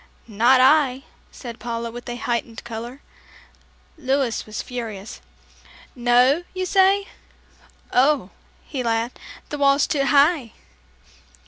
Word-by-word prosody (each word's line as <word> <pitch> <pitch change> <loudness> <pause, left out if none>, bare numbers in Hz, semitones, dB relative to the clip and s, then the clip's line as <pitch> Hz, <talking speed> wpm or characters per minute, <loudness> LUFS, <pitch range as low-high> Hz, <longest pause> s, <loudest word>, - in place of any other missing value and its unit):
"Not 235 +4 +4
I," 270 -1 +4 0.3
said 235 -3 -9
Paula, 235 -1 -4
with 240 +1 -9
a 240 - -4
heightened 235 -1 -3
color. 235 +4 -8 1.0
Louis 265 -4 0
was 215 - -5
furious. 225 -5 -7 0.7
"No, 245 +5 +3
you 370 0 -2
say? 390 +1 +3 0.9
Oh," 260 -5 +2 0.3
he 270 -4 -4
laughed, 230 0 -2 0.3
"the 295 - -5
wall's 280 0 +4
too 275 -3 0
high." 285 -4 +3
250 Hz, 110 wpm, -22 LUFS, 235-280 Hz, 1.0 s, Not